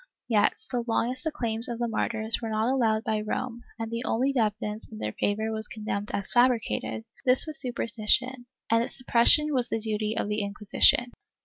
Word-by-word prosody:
^ -, -, -25 dB, 0.2 s
Yet, 215 Hz, -4 st, +2 dB
so 245 Hz, -1 st, -2 dB
long 230 Hz, +1 st, 0 dB
as 255 Hz, 0 st, -4 dB
the 315 Hz, -, -2 dB
claims 230 Hz, -3 st, +1 dB
of 235 Hz, -, -4 dB
the 240 Hz, 0 st, -1 dB
martyrs 220 Hz, 0 st, 0 dB
were 225 Hz, -, -4 dB
not 220 Hz, +4 st, 0 dB
allowed 220 Hz, -4 st, +1 dB
by 215 Hz, -2 st, -1 dB
Rome 235 Hz, +3 st, -4 dB, 0.2 s
and 225 Hz, -1 st, -5 dB
the 230 Hz, +1 st, -3 dB
only 260 Hz, +4 st, 0 dB
evidence 210 Hz, -2 st, -2 dB
in 110 Hz, -, -9 dB
their 105 Hz, 0 st, -3 dB
favor 220 Hz, +2 st, -1 dB
was 220 Hz, 0 st, -4 dB
condemned 210 Hz, -2 st, -5 dB
as 200 Hz, -, -3 dB
fabricated, 240 Hz, -2 st, +1 dB, 0.2 s
this 255 Hz, -1 st, +5 dB
was 310 Hz, -2 st, +1 dB
superstition, 245 Hz, +1 st, -1 dB, 0.2 s
and 230 Hz, 0 st, +4 dB
its -, -, 0 dB
suppression 255 Hz, +4 st, +4 dB
was 250 Hz, -3 st, +2 dB
the 225 Hz, -, -1 dB
duty 215 Hz, 0 st, -2 dB
of -, -, -1 dB
the 210 Hz, +1 st, -1 dB
Inquisition. 210 Hz, +4 st, +2 dB
225 Hz, 200 wpm, -27 LUFS, 215-245 Hz, 0.2 s, this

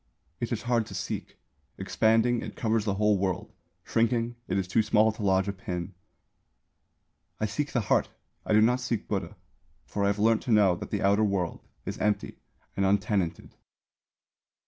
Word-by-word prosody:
It 120 Hz, -, -3 dB
is 110 Hz, -3 st, -2 dB
hard 120 Hz, -2 st, +1 dB
to -, -, -8 dB
seek. -, -, -5 dB, 0.4 s
Expanding, 115 Hz, +4 st, +2 dB
it -, -, -7 dB
covers 110 Hz, -2 st, 0 dB
the 100 Hz, -2 st, 0 dB
whole 105 Hz, -1 st, +2 dB
world; 95 Hz, -2 st, -2 dB, 0.3 s
shrinking, 115 Hz, +1 st, +1 dB
it 95 Hz, -, 0 dB
is 95 Hz, -2 st, -1 dB
too 100 Hz, +5 st, +3 dB
small 110 Hz, 0 st, +3 dB
to 110 Hz, -, -10 dB
lodge 95 Hz, -1 st, +2 dB
a 100 Hz, -, -1 dB
pin. 90 Hz, -3 st, -5 dB, 1.5 s
"I 110 Hz, -, +1 dB
seek 125 Hz, +8 st, -2 dB
the 125 Hz, -, +1 dB
heart; 100 Hz, -, +1 dB, 0.3 s
I -, -, -1 dB
do 105 Hz, -, +6 dB
not 120 Hz, +3 st, +3 dB
seek 120 Hz, -4 st, -2 dB
Buddha. 95 Hz, -5 st, -3 dB, 0.5 s
For 100 Hz, -, -3 dB
I -, -, +3 dB
have 100 Hz, +1 st, +1 dB
learnt 110 Hz, +1 st, +3 dB
to 125 Hz, -, -3 dB
know 105 Hz, -4 st, +5 dB
that 105 Hz, -, -7 dB
the 100 Hz, -2 st, -2 dB
outer 100 Hz, +2 st, +4 dB
world 95 Hz, -5 st, -1 dB, 0.2 s
is -, -, -5 dB
empty 105 Hz, -1 st, -1 dB, 0.4 s
and 100 Hz, -, 0 dB
untenanted." 95 Hz, -3 st, 0 dB
105 Hz, 175 wpm, -28 LUFS, 100-115 Hz, 1.5 s, do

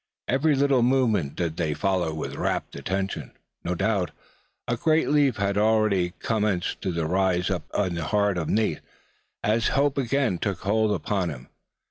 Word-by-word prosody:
Every 140 Hz, +4 st, +2 dB
little 135 Hz, -2 st, +3 dB
movement 115 Hz, -, +2 dB
did 85 Hz, -2 st, -2 dB
they 80 Hz, -4 st, -1 dB
follow 95 Hz, -5 st, 0 dB
with 80 Hz, 0 st, -5 dB
wrapt -, -, -2 dB
attention. 95 Hz, -6 st, -3 dB, 0.3 s
No 90 Hz, -, -1 dB
doubt, 100 Hz, -1 st, 0 dB, 0.6 s
a 120 Hz, -, +1 dB
great 155 Hz, +6 st, +2 dB
relief 145 Hz, -4 st, +3 dB
had 100 Hz, 0 st, 0 dB
already 105 Hz, -5 st, +2 dB
commenced 105 Hz, -5 st, -1 dB
to 85 Hz, -5 st, -1 dB
rise 90 Hz, +1 st, +1 dB
up 85 Hz, -5 st, -2 dB
in 95 Hz, -4 st, +1 dB
the 85 Hz, -2 st, -3 dB
heart 100 Hz, +1 st, +1 dB
of 80 Hz, -, -3 dB
Nate, 105 Hz, -8 st, +1 dB, 0.6 s
as 110 Hz, +3 st, +2 dB
hope 140 Hz, 0 st, +1 dB
again 130 Hz, -7 st, 0 dB
took 100 Hz, -3 st, -2 dB
hold 110 Hz, +2 st, +1 dB
upon 95 Hz, -1 st, -1 dB
him. 65 Hz, -3 st, -9 dB
100 Hz, 160 wpm, -25 LUFS, 90-115 Hz, 0.6 s, little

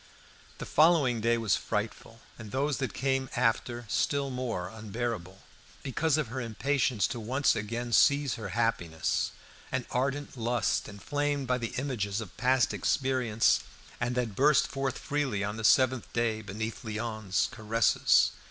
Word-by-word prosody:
The -, -, -6 dB
following 150 Hz, -7 st, +4 dB
day 115 Hz, +1 st, +2 dB
was 110 Hz, -5 st, +2 dB
frightful, 115 Hz, +1 st, -4 dB, 0.2 s
and 110 Hz, -2 st, -8 dB
those 140 Hz, +5 st, 0 dB
that 135 Hz, -5 st, -2 dB
came 135 Hz, +1 st, -1 dB
after 120 Hz, 0 st, 0 dB
still 140 Hz, +5 st, 0 dB
more 120 Hz, -8 st, -3 dB
unbearable, 110 Hz, -4 st, -5 dB, 0.4 s
because 150 Hz, +3 st, +1 dB
of 150 Hz, -7 st, -1 dB
her 130 Hz, +2 st, -4 dB
impatience 120 Hz, 0 st, 0 dB
to 120 Hz, -, -4 dB
once 130 Hz, +6 st, +1 dB
again 115 Hz, +3 st, -3 dB
seize 140 Hz, +2 st, +4 dB
her 110 Hz, -3 st, -5 dB
happiness; 100 Hz, -9 st, 0 dB, 0.4 s
an 130 Hz, -1 st, -1 dB
ardent 140 Hz, +3 st, -1 dB
lust, 120 Hz, -1 st, 0 dB
inflamed 145 Hz, +7 st, -2 dB
by 125 Hz, 0 st, 0 dB
the 115 Hz, -1 st, -4 dB
images 115 Hz, -7 st, -2 dB
of 110 Hz, -6 st, -8 dB
past 125 Hz, +2 st, +2 dB
experience, 125 Hz, -5 st, +2 dB, 0.4 s
and 120 Hz, 0 st, -1 dB
that 120 Hz, -5 st, -1 dB
burst 150 Hz, +4 st, +4 dB
forth 135 Hz, -1 st, -2 dB
freely 135 Hz, -9 st, -1 dB
on 105 Hz, +2 st, -3 dB
the 115 Hz, -, -5 dB
seventh 130 Hz, +1 st, +3 dB
day 115 Hz, -2 st, 0 dB
beneath 110 Hz, +2 st, -5 dB
Léon's 110 Hz, -4 st, -1 dB
caresses. 110 Hz, +1 st, +3 dB
120 Hz, 145 wpm, -29 LUFS, 110-135 Hz, 0.4 s, following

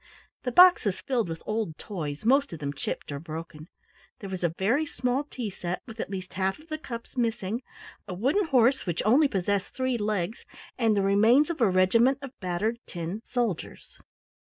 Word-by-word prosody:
The 250 Hz, -, -2 dB
box 360 Hz, +6 st, +8 dB
was 190 Hz, -2 st, 0 dB
filled 235 Hz, -4 st, -1 dB
with 165 Hz, 0 st, -6 dB
old 215 Hz, -7 st, -2 dB
toys, 155 Hz, -4 st, -5 dB
most 275 Hz, +2 st, +4 dB
of 165 Hz, -, -6 dB
them 145 Hz, -2 st, -4 dB
chipped 140 Hz, -, -5 dB
or 140 Hz, -, -4 dB
broken. 160 Hz, 0 st, -8 dB, 0.5 s
There 195 Hz, -2 st, -8 dB
was 185 Hz, -1 st, -4 dB
a 170 Hz, -, +3 dB
very 235 Hz, +11 st, +2 dB
small 260 Hz, -1 st, -1 dB
tea 245 Hz, -7 st, -5 dB
set 180 Hz, -1 st, -4 dB
with 225 Hz, 0 st, -11 dB
at -, -, -3 dB
least 185 Hz, -2 st, -6 dB
half 190 Hz, +1 st, 0 dB
of 310 Hz, +2 st, -19 dB
the 310 Hz, 0 st, -3 dB
cups 235 Hz, -5 st, -8 dB
missing, 230 Hz, -2 st, -1 dB, 0.5 s
a 180 Hz, -, -5 dB
wooden 275 Hz, -, +1 dB
horse 255 Hz, -4 st, +3 dB
which 170 Hz, -2 st, -1 dB
only 270 Hz, +8 st, +5 dB
possessed 200 Hz, -3 st, -1 dB
three 260 Hz, -2 st, 0 dB
legs, 210 Hz, 0 st, -2 dB, 0.3 s
and 225 Hz, -4 st, +2 dB
the 200 Hz, -, +2 dB
remains 225 Hz, -, +4 dB
of 310 Hz, -, -6 dB
a 225 Hz, -, +5 dB
regiment 230 Hz, +8 st, +4 dB
of 275 Hz, -, -6 dB
battered 190 Hz, +6 st, -1 dB
tin 175 Hz, +4 st, -5 dB
soldiers. 235 Hz, -9 st, -3 dB
215 Hz, 190 wpm, -27 LUFS, 185-250 Hz, 0.5 s, box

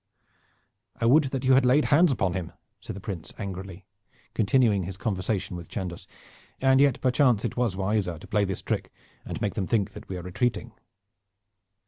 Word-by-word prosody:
"I -, -, 0 dB
would 140 Hz, +6 st, +5 dB
that 135 Hz, -1 st, -3 dB
you 130 Hz, -, +5 dB
had 130 Hz, 0 st, +5 dB
laid 130 Hz, +4 st, +4 dB
hands 165 Hz, +2 st, +6 dB
upon 95 Hz, -8 st, 0 dB
him," 90 Hz, -3 st, -4 dB, 0.3 s
said -, -, -7 dB
the -, -, -7 dB
Prince 95 Hz, -5 st, -6 dB
angrily, 95 Hz, -2 st, -7 dB, 0.5 s
continuing 110 Hz, -2 st, +3 dB
his 95 Hz, +1 st, -6 dB
conversation 95 Hz, -2 st, -2 dB
with 85 Hz, -1 st, -8 dB
Chandos, 90 Hz, -5 st, -5 dB, 0.5 s
"and 135 Hz, 0 st, +4 dB
yet, 140 Hz, -2 st, +3 dB
perchance, 125 Hz, -4 st, +3 dB
it -, -, -3 dB
was 120 Hz, -6 st, 0 dB
wiser 95 Hz, -3 st, 0 dB
to 80 Hz, -, -12 dB
play 105 Hz, -1 st, +1 dB
this 95 Hz, -2 st, -3 dB
trick -, -, -2 dB, 0.3 s
and -, -, -5 dB
make -, -, 0 dB
them 95 Hz, -, -2 dB
think 105 Hz, -5 st, +1 dB
that -, -, -11 dB
we 95 Hz, -, -4 dB
were 90 Hz, -, -6 dB
retreating." 120 Hz, +5 st, -1 dB
105 Hz, 180 wpm, -26 LUFS, 95-125 Hz, 0.5 s, hands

